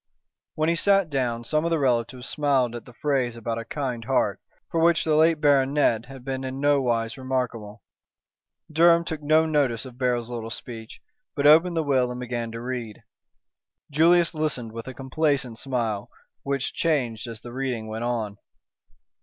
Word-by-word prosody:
When 155 0 0
he 170 - +3
sat 195 0 +3
down 120 -4 -1
some 155 +6 0
of 170 - 0
the 165 - +2
relatives 125 -2 0
smiled 135 -5 +1
at 120 - -8
the 125 - -14
phrase 130 -3 -1
about 115 0 -3
a 115 - -7
kind 125 -3 -3
heart, - - +1 0.3
for 165 - 0
which 170 0 +4
the 155 -1 +2
late 160 0 +4
baronet 140 -5 +3
had 135 -2 -11
been 135 -1 -3
in 130 0 -5
no 145 0 +3
wise 115 -1 -1
remarkable. 125 -5 -3 0.9
Durham 170 +2 +5
took 160 -2 -4
no 155 +2 +4
notice 140 -7 0
of 125 -1 -12
Beryl's 125 -2 0
little 115 -2 -5
speech, 115 -1 -9 0.3
but 145 -2 -1
opened 165 +3 +6
the 160 - +2
will 130 -4 +2
and 125 0 -5
began 120 -2 -4
to 115 - -6
read. 120 -4 -5 0.9
Julius 170 +4 +4
listened 150 -7 -2
with 115 +2 -8
a 130 - -7
complacent 135 -3 -1
smile, 115 -6 -2 0.3
which 140 -1 -2
changed 125 -8 -1
as 115 -2 -7
the 120 0 -9
reading 130 -4 -3
went 110 +1 -5
on. 115 -4 -2
130 Hz, 175 wpm, -25 LUFS, 115-150 Hz, 0.9 s, opened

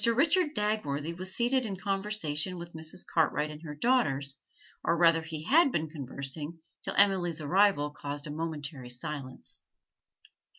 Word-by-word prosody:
Richard 300 +7 +3
Dagworthy 170 -7 -1
was 185 +2 -1
seated 255 +2 +2
in 200 -5 -3
conversation 195 -4 0
with 170 0 -8
Mrs. 160 +2 -2
Cartwright 155 -2 +1
and 150 0 -10
her 150 -3 -7
daughters 145 - +1 0.5
or 170 - +2
rather 165 -1 +5
he 160 -1 -6
had 290 - +5
been 160 -5 -1
conversing 145 +2 -5 0.3
till - - -2
Emily's 185 -5 +4
arrival 155 -1 +3
caused 145 0 -5
a 150 - -5
momentary 150 -5 -5
silence. 130 +1 -6
165 Hz, 140 wpm, -30 LUFS, 150-200 Hz, 0.5 s, rather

